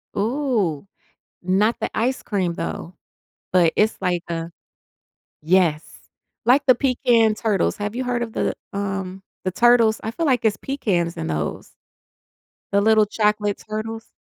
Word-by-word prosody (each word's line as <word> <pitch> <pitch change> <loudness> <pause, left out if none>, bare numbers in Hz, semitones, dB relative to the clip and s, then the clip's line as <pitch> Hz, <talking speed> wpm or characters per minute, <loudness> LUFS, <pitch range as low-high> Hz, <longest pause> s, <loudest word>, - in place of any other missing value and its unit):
Ooh, 215 - -1 0.5
not 195 +5 +1
the - - -2
ice 255 +4 0
cream 185 -5 -1
though, 170 +1 -5 0.6
but 175 -3 +4
it's 215 +1 +2
like 180 -3 0
a 165 0 -4 0.9
Yes, 165 -1 +2 0.6
like 270 +4 +4
the 260 - +7
pecan 240 -4 +2
turtles, 215 -4 0
have 205 +1 -4
you 255 - -2
heard 245 -1 -1
of 225 -2 -7
the, - - -1 0.2
um, 195 -1 -4 0.2
the 185 - -1
Turtles? 235 +1 +4
I 220 - -2
feel 330 +9 -2
like 255 -5 +2
it's 215 -2 +2
pecans 185 -11 -1
in 80 - -3
those. 75 -2 -3 1.0
The 200 - +3
little 215 +1 +4
chocolate 210 -1 0
turtles? 225 +1 -5
210 Hz, 145 wpm, -22 LUFS, 185-235 Hz, 1.0 s, the